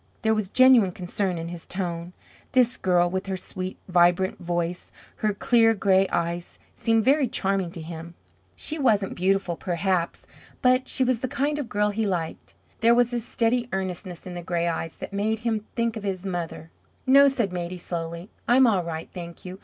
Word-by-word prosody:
There 220 Hz, 0 st, +3 dB
was 215 Hz, -3 st, -1 dB
genuine 255 Hz, -6 st, +6 dB
concern 180 Hz, 0 st, -2 dB
in 165 Hz, 0 st, -5 dB
his 175 Hz, -1 st, -9 dB
tone. 175 Hz, -2 st, -4 dB, 0.4 s
This 250 Hz, -1 st, +4 dB
girl, 175 Hz, -2 st, +2 dB
with 190 Hz, +2 st, -3 dB
her 190 Hz, -1 st, -2 dB
sweet, 185 Hz, 0 st, -6 dB
vibrant 175 Hz, +1 st, +3 dB
voice, 175 Hz, 0 st, -3 dB, 0.3 s
her 215 Hz, -, +1 dB
clear 225 Hz, +2 st, +3 dB
gray 195 Hz, -1 st, +3 dB
eyes, 170 Hz, +1 st, -2 dB, 0.2 s
seemed 225 Hz, -1 st, +1 dB
very 275 Hz, 0 st, +4 dB
charming 195 Hz, -4 st, -1 dB
to 170 Hz, -, -7 dB
him. 165 Hz, +1 st, -8 dB, 0.4 s
She 315 Hz, 0 st, -1 dB
wasn't 210 Hz, -8 st, +2 dB
beautiful, 190 Hz, -1 st, +1 dB
perhaps, 175 Hz, 0 st, -1 dB, 0.4 s
but 255 Hz, +1 st, +3 dB
she 260 Hz, -, +2 dB
was 255 Hz, -2 st, +1 dB
the 260 Hz, -, -2 dB
kind 290 Hz, +4 st, -1 dB
of 265 Hz, -6 st, -4 dB
girl 210 Hz, 0 st, +1 dB
he 215 Hz, +1 st, -1 dB
liked. 170 Hz, -4 st, -4 dB, 0.2 s
There 235 Hz, +1 st, +5 dB
was 245 Hz, 0 st, +3 dB
a 240 Hz, -, +1 dB
steady 235 Hz, +1 st, 0 dB
earnestness 185 Hz, -1 st, -4 dB
in 180 Hz, -, -7 dB
the 175 Hz, -, -5 dB
gray 170 Hz, -1 st, -1 dB
eyes 165 Hz, -1 st, -3 dB
that -, -, -8 dB
made 215 Hz, +2 st, 0 dB
him 220 Hz, -2 st, -1 dB
think 230 Hz, -1 st, 0 dB
of 220 Hz, -, -6 dB
his 195 Hz, -2 st, -3 dB
mother. 170 Hz, -3 st, -4 dB, 0.3 s
"No," 275 Hz, +2 st, +7 dB
said 240 Hz, -9 st, 0 dB
Maidie, 175 Hz, 0 st, -4 dB
slowly. 170 Hz, +1 st, -5 dB, 0.2 s
"I'm 255 Hz, +2 st, +6 dB
all 200 Hz, -7 st, +3 dB
right, 165 Hz, -1 st, -5 dB
thank 170 Hz, -1 st, -9 dB
you. 185 Hz, +1 st, -8 dB
190 Hz, 185 wpm, -25 LUFS, 175-230 Hz, 0.4 s, No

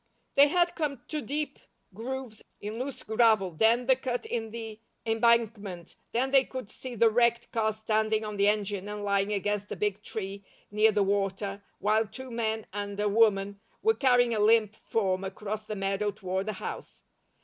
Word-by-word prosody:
They 280 Hz, +1 st, +7 dB
had 345 Hz, +3 st, +2 dB
come 285 Hz, -7 st, -3 dB
to 305 Hz, -1 st, -2 dB
deep 290 Hz, 0 st, -3 dB, 0.3 s
grooves 240 Hz, +1 st, -6 dB, 0.2 s
in 215 Hz, +3 st, -5 dB
loose 265 Hz, +1 st, -5 dB
gravel, 220 Hz, -4 st, +3 dB
then 225 Hz, +8 st, +3 dB
the 260 Hz, +1 st, +5 dB
cut 250 Hz, -2 st, -3 dB
in 225 Hz, -2 st, -3 dB
the 225 Hz, -1 st, -7 dB, 0.3 s
embankment, 225 Hz, -6 st, +1 dB, 0.2 s
then 260 Hz, +3 st, 0 dB
they 270 Hz, -1 st, +6 dB
could 255 Hz, -5 st, -7 dB
see 255 Hz, -2 st, -7 dB
the 230 Hz, 0 st, +4 dB
wrecked 235 Hz, +1 st, +2 dB
car 220 Hz, -1 st, +1 dB
standing 220 Hz, 0 st, 0 dB
on 210 Hz, -1 st, -5 dB
the 200 Hz, 0 st, +4 dB
engine 205 Hz, -1 st, 0 dB
and 210 Hz, 0 st, -5 dB
lying 200 Hz, 0 st, +1 dB
against 205 Hz, 0 st, -1 dB
a -, -, -2 dB
big 210 Hz, -1 st, -1 dB
tree, 200 Hz, -2 st, -5 dB, 0.3 s
near 215 Hz, +1 st, +4 dB
the 205 Hz, -1 st, +2 dB
water, 200 Hz, 0 st, -1 dB, 0.2 s
while 215 Hz, +2 st, +2 dB
two 260 Hz, +4 st, -9 dB
men 220 Hz, -2 st, -1 dB
and 205 Hz, 0 st, -4 dB
a 210 Hz, -, +2 dB
woman 200 Hz, -2 st, +3 dB, 0.2 s
were 445 Hz, +1 st, +5 dB
carrying 245 Hz, -, +3 dB
a 215 Hz, -, 0 dB
limp 215 Hz, 0 st, +4 dB
form 190 Hz, -5 st, -1 dB
across 210 Hz, +2 st, -5 dB
the 215 Hz, -, -4 dB
meadow 195 Hz, +1 st, 0 dB
toward 190 Hz, -1 st, -3 dB
the 215 Hz, -, -1 dB
house. 190 Hz, -, -7 dB
215 Hz, 180 wpm, -29 LUFS, 205-235 Hz, 0.3 s, They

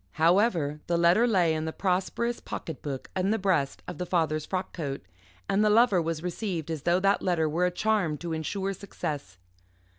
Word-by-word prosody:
However, 165 Hz, -3 st, +2 dB
the 170 Hz, -, +1 dB
letter 175 Hz, +8 st, +4 dB
lay 180 Hz, -8 st, +3 dB
in 155 Hz, 0 st, -2 dB
the 160 Hz, -, -2 dB
prosperous 195 Hz, +7 st, -1 dB
pocket 160 Hz, -4 st, -6 dB
book 135 Hz, -3 st, -6 dB
in 190 Hz, +1 st, +1 dB
the 220 Hz, -, +2 dB
breast 180 Hz, -9 st, 0 dB
of -, -, -7 dB
the 180 Hz, -, -2 dB
father's 155 Hz, -4 st, 0 dB
frock 185 Hz, -1 st, -3 dB
coat, 140 Hz, -5 st, -4 dB, 0.4 s
and 200 Hz, +2 st, +2 dB
the 215 Hz, -, +4 dB
Lover 210 Hz, -4 st, +5 dB
was 165 Hz, 0 st, -3 dB
received 180 Hz, -3 st, -3 dB
as 155 Hz, -3 st, -3 dB
though 175 Hz, +4 st, +2 dB
that 195 Hz, +1 st, +3 dB
letter 170 Hz, -4 st, +1 dB
were 170 Hz, +4 st, +1 dB
a -, -, -1 dB
charm 190 Hz, -5 st, 0 dB
to 170 Hz, +1 st, -4 dB
ensure 190 Hz, +5 st, -2 dB
success. 145 Hz, -, -6 dB
175 Hz, 190 wpm, -28 LUFS, 160-195 Hz, 0.4 s, Lover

